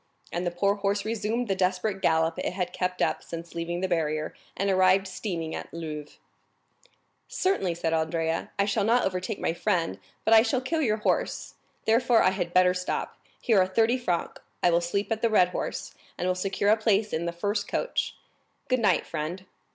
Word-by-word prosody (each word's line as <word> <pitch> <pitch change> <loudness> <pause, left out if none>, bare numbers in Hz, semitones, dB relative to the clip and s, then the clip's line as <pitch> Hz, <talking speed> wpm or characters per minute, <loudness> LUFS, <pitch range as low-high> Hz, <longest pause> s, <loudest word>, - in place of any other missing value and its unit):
And 175 +1 -2
the - - +3
poor 195 +3 +1
horse 200 0 0
resumed 225 +2 -1
the 195 - +1
desperate 190 +2 0
gallop 160 0 +2
it - - -2
had 180 -1 -3
kept 180 0 -1
up - - 0
since 170 0 -8
leaving 170 +1 -3
the 190 - +1
barrier, 155 -3 -1 0.2
and 200 - 0
arrived 190 0 +4
steaming 170 -5 -4
at - - -6
Louvres. 155 -3 -7 1.1
"Certainly," 195 - 0
said 165 -1 -1
Andrea, 160 0 -1
"I 200 - +3
shall 205 0 +1
not 235 +4 +3
overtake 185 +3 -2
my - - 0
friend, 170 - 0 0.3
but 225 - +5
I 220 - +9
shall 250 +3 +1
kill 315 +6 -1
your 215 -7 +2
horse, 210 - -1 0.3
therefore 230 +1 +4
I 185 - +4
had 180 -3 -3
better 180 0 +5
stop. 180 0 -3 0.2
Here 220 -5 +3
are 185 - +2
thirty 225 +6 +2
francs; 180 -8 -2 0.2
I 175 - +5
will 170 +1 +3
sleep 200 +5 -2
at 220 0 0
the 230 - +4
Cheval 180 -5 +3
Rouge, - - -6 0.3
and 180 - -1
will 185 - +3
secure 195 +2 +1
a 220 - +5
place 215 -1 +1
in 170 +2 -1
the - - 0
first 205 +4 -2
coach. - - -1 0.5
Good 255 -1 +2
night, 200 -6 +2
friend." 165 +4 -4
185 Hz, 195 wpm, -27 LUFS, 170-215 Hz, 1.1 s, I